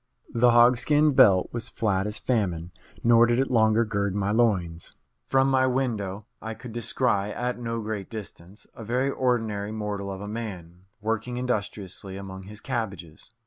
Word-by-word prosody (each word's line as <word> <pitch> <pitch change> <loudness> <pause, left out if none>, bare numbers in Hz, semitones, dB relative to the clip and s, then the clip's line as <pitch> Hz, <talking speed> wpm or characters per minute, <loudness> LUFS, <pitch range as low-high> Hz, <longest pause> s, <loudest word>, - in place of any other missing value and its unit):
The 120 +1 +5
hogskin 125 +6 +5
belt 95 -7 +5
was 120 0 -4
flat 100 -3 0
as 105 - -3
famine, 90 -8 -1 0.3
nor 115 0 +6
did 120 0 +2
it 135 0 0
longer 110 -1 +4
gird 100 -3 -1
my 100 0 0
loins. 95 -8 0 0.3
From 135 0 +3
my 130 -1 +3
window 110 -7 -2 0.2
I 110 0 -5
could 125 0 -10
descry, 115 -3 0
at 125 +1 -3
no 115 -1 -3
great 105 -3 -4
distance, 100 -2 -9
a 115 - -9
very 125 +5 0
ordinary 110 -6 -1
mortal 105 -2 -4
of 95 - -6
a 105 - -6
man, 95 -5 -7 0.2
working 115 +3 -2
industriously 100 -5 -4
among 95 -1 -8
his 105 +1 -9
cabbages. 100 -12 -5
110 Hz, 160 wpm, -26 LUFS, 100-120 Hz, 0.3 s, nor